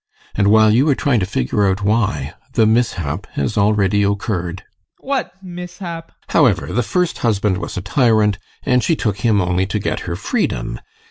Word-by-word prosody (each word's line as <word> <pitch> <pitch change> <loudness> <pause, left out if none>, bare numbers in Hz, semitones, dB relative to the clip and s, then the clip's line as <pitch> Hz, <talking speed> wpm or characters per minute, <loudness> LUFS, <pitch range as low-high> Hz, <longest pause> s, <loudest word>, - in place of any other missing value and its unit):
And 100 - +1
while 110 +1 +5
you 135 +7 +3
are 140 - +4
trying 130 -4 +1
to 95 - -1
figure 95 +5 0
out 95 +2 -1
why, 105 +1 0 0.2
the 110 - +3
mishap 100 -7 0
has 70 +9 -2
already 105 -1 +2
occurred. 100 -3 -2
ADOLPH. 95 - -28
What 275 -2 -1
mishap? 175 -2 -7 0.2
GUSTAV. - - -10
However, 125 - +3
the 125 - +2
first 180 +8 -1
husband 105 -4 +1
was - - -6
a - - -2
tyrant, 110 -2 +2 0.2
and 125 -2 +2
she 165 - +2
took 105 -9 -1
him 110 -1 +2
only 90 0 0
to 105 - -2
get 105 - -2
her 85 - -2
freedom. - - -2
105 Hz, 185 wpm, -18 LUFS, 95-125 Hz, 0.2 s, while